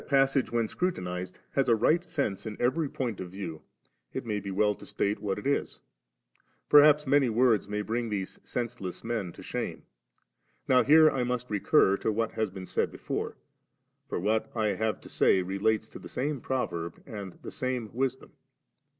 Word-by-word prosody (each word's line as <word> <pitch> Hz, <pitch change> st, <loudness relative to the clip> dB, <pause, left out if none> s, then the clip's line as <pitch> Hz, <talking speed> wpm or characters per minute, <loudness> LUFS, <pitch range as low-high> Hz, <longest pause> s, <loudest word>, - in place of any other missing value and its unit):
passage, 135 Hz, -1 st, +3 dB
when 115 Hz, -1 st, +1 dB
scrutinized, 90 Hz, -, -3 dB
has 135 Hz, -2 st, +1 dB
a -, -, +6 dB
rij^t 155 Hz, +10 st, +3 dB
sense 140 Hz, -, -2 dB
in 105 Hz, -, -6 dB
every 140 Hz, +5 st, +1 dB
point 120 Hz, -7 st, -3 dB
of 90 Hz, -, -5 dB
view, 85 Hz, -4 st, -6 dB, 0.5 s
it -, -, -4 dB
may 105 Hz, -2 st, -1 dB
be 100 Hz, 0 st, -6 dB
well 105 Hz, +2 st, +2 dB
to -, -, -14 dB
state 100 Hz, +1 st, -1 dB
what 100 Hz, -2 st, -1 dB
it 105 Hz, -, -7 dB
is; 140 Hz, +1 st, 0 dB, 0.9 s
periiaps 150 Hz, 0 st, +7 dB
many 140 Hz, -2 st, +4 dB
words 115 Hz, -2 st, +3 dB
may 105 Hz, 0 st, -2 dB
bring 115 Hz, +2 st, -2 dB
these 100 Hz, -3 st, -4 dB
sensdess 115 Hz, -7 st, -5 dB
men 115 Hz, -6 st, -2 dB
to -, -, -12 dB
shame. -, -, -4 dB, 0.8 s
Now 130 Hz, -1 st, +6 dB
here 155 Hz, +5 st, +7 dB
I 130 Hz, -, 0 dB
must 125 Hz, -1 st, -2 dB
recur 100 Hz, -1 st, +4 dB
to 110 Hz, -, 0 dB
what 115 Hz, +1 st, -1 dB
has 110 Hz, -2 st, -1 dB
been 95 Hz, 0 st, -8 dB
said -, -, -1 dB
before, -, -, -4 dB, 0.7 s
for -, -, -2 dB
what 110 Hz, +1 st, 0 dB
I 110 Hz, -2 st, +1 dB
have 105 Hz, +1 st, -1 dB
to -, -, -12 dB
say 95 Hz, -, +3 dB
relates 105 Hz, +4 st, 0 dB
to -, -, -10 dB
the -, -, -10 dB
same 140 Hz, 0 st, -2 dB
proverb 85 Hz, -11 st, -3 dB
and 100 Hz, -7 st, -7 dB
the -, -, -6 dB
same 125 Hz, -4 st, -3 dB
Wis 130 Hz, +1 st, 0 dB
dom. -, -, -17 dB
110 Hz, 185 wpm, -29 LUFS, 100-130 Hz, 0.9 s, periiaps